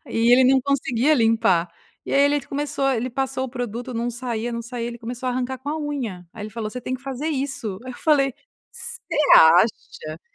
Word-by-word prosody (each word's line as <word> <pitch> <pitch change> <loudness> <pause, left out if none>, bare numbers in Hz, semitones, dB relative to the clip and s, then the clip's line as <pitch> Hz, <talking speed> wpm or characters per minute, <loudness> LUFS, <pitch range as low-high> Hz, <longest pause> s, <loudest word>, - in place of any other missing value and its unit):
e 230 0 +1
ele 255 +1 +6
não 265 +1 +5
conseguia 275 0 +1
limpar, 225 -8 +2 0.4
e - - -4
aí, 275 - +4
ele 285 0 +3
começou 280 -1 -2
ele - - 0
começou 225 - -2
ele 255 - -3
passou 265 +1 -2
o - - -4
produto, 245 0 -5
não 235 +1 -2
saía, 240 -1 -4
não 235 0 -4
saía, 235 0 -5
ele 235 0 -8
começou 245 +2 -6
a - - +1
arrancar 255 +1 -3
com 275 +3 -8
a 310 - -2
unha 255 -12 -4
aí 215 - -9
ele 215 - -7
falou: 215 -1 -5
"Você 250 - -6
tem 255 +2 -3
que 260 - -8
fazer 275 +2 -4
isso." 265 -9 -3
Aí 255 - -6
eu - - -12
falei: 275 -4 +3 0.4
"Você - - -6 0.3
acha 200 - +4
250 Hz, 225 wpm, -23 LUFS, 230-270 Hz, 0.4 s, ele